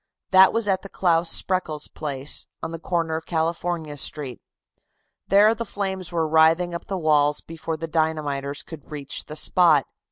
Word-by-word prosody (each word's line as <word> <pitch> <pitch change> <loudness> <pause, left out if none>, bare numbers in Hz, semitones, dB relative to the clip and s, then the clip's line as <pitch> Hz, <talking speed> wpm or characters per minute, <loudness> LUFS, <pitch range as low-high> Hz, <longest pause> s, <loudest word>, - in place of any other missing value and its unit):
That 190 0 +7
was 225 -1 -1
at 190 -1 +1
the 195 - -10
Claus 170 -3 +1
Spreckels 155 -5 0
place, 140 -2 -3 0.2
on 160 - -3
the 165 - -6
corner 165 -2 -1
of 160 - -9
California 165 -1 -2
Street. 135 -3 -2 0.9
There 205 +3 +5
the 230 +1 -4
flames 190 -4 -4
were 165 -2 0
writhing 160 +3 +4
up 170 - -6
the 195 - -2
walls 150 -3 +2
before 165 0 -5
the 165 +1 -5
dynamiters 150 -3 -2
could 160 -3 -11
reach 145 -2 -5
the 150 - -8
spot. 155 -4 +4
165 Hz, 165 wpm, -23 LUFS, 150-180 Hz, 0.9 s, That